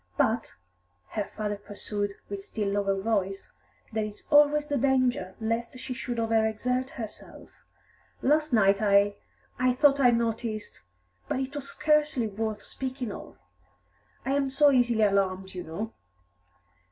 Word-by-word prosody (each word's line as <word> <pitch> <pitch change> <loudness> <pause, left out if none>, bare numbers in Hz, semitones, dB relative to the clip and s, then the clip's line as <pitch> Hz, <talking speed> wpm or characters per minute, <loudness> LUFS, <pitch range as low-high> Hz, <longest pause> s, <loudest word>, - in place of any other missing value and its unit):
"But," 225 +1 +1 0.5
her 210 - -2
father 210 -1 -2
pursued, 205 0 -4
with 200 -1 -6
still 205 0 -2
lower 200 -1 0
voice, 195 -2 -1 0.4
"there 220 0 0
is 210 -1 -9
always 295 0 +6
the 290 -1 -2
danger 255 -7 +1
lest 230 +2 -2
she 255 0 -5
should 245 -1 -4
over 225 -1 +2
exert 250 +4 -1
herself. 220 -4 -8 0.7
Last 300 +2 +3
night 200 -3 +4
I 200 -1 +4 0.4
I 255 0 +3
thought 280 +2 +4
I 255 -3 +6
noticed 225 -2 -1 0.5
but - - -1
it 265 +1 -3
was 280 -1 -5
scarcely 300 -5 +2
worth 215 0 -3
speaking 260 -3 -5
of; - - -9 0.9
I 265 - 0
am 280 -1 +1
so 285 +2 +5
easily 240 -4 +3
alarmed, 190 -2 +1
you 180 -1 -5
know." 210 +8 -5
225 Hz, 140 wpm, -28 LUFS, 205-260 Hz, 0.9 s, always